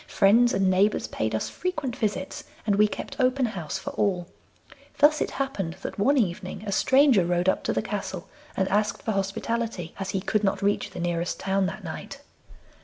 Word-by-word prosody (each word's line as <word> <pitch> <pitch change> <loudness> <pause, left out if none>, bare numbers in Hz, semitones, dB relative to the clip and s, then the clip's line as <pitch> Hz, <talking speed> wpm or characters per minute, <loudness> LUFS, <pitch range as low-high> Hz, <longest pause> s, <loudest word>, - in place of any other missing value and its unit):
Friends 230 +5 +4
and 195 0 +2
neighbours 190 +3 +3
paid 110 0 -2
us 110 - -1
frequent 310 -9 -3
visits, 205 -4 -2 0.2
and 205 -2 +2
we 210 +1 +5
kept - - -7
open 255 0 +3
house 175 -9 -4
for - - -6
all. 185 -4 0 0.7
Thus 300 +1 +5
it - - 0
happened 205 -12 -3
that - - -5
one 280 +8 +3
evening 185 -3 -1
a 200 - -3
stranger 260 -1 +5
rode 175 +1 0
up 190 - +2
to - - +1
the - - -1
castle 195 -3 -4 0.3
and 190 - +2
asked 210 +1 0
for 220 - -1
hospitality, 195 -1 -2
as 195 -1 -3
he 195 - -1
could 210 +2 0
not 195 0 0
reach 205 +1 +1
the - - -8
nearest 175 0 -1
town 195 0 +1
that - - -6
night. - - -7
200 Hz, 190 wpm, -26 LUFS, 185-230 Hz, 0.7 s, we